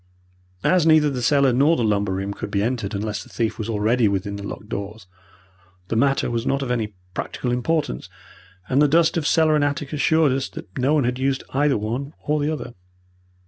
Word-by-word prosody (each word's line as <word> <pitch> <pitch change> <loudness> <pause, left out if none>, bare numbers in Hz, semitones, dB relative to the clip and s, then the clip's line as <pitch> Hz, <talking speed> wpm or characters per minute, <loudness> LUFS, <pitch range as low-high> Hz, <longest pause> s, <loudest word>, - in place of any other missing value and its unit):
As 180 -3 +3
neither 155 -2 +5
the 125 -2 -3
cellar 140 0 +3
nor 145 +7 +4
the 120 - 0
lumber 100 -3 +1
room 95 +1 -3
could - - -6
be 100 0 0
entered 115 -4 -2
unless 105 0 -3
the - - -13
thief 115 -1 -2
was 110 +1 -4
already 110 +2 +2
within 100 0 -2
the 100 - -6
locked 100 +1 -7
doors, 100 0 -6 0.8
the - - -1
matter 135 +1 +2
was 115 -1 -1
not 135 +2 0
of 125 - -3
any 110 -4 -2 0.2
practical 125 - -3
importance, 125 - -1 0.6
and 135 +3 +2
the 150 - +6
dust 160 +3 +3
of 160 -3 0
cellar 160 -1 +4
and 150 -1 +3
attic 145 0 -2
assured 155 0 +3
us 130 0 -1
that 90 - -11
no 135 +4 +2
one 145 - +2
had 125 +1 -1
used 135 0 0
either 140 0 +2
one 120 +8 -4
or 150 +1 0
the 145 +1 0
other. 150 -6 -5
125 Hz, 210 wpm, -22 LUFS, 105-145 Hz, 0.8 s, the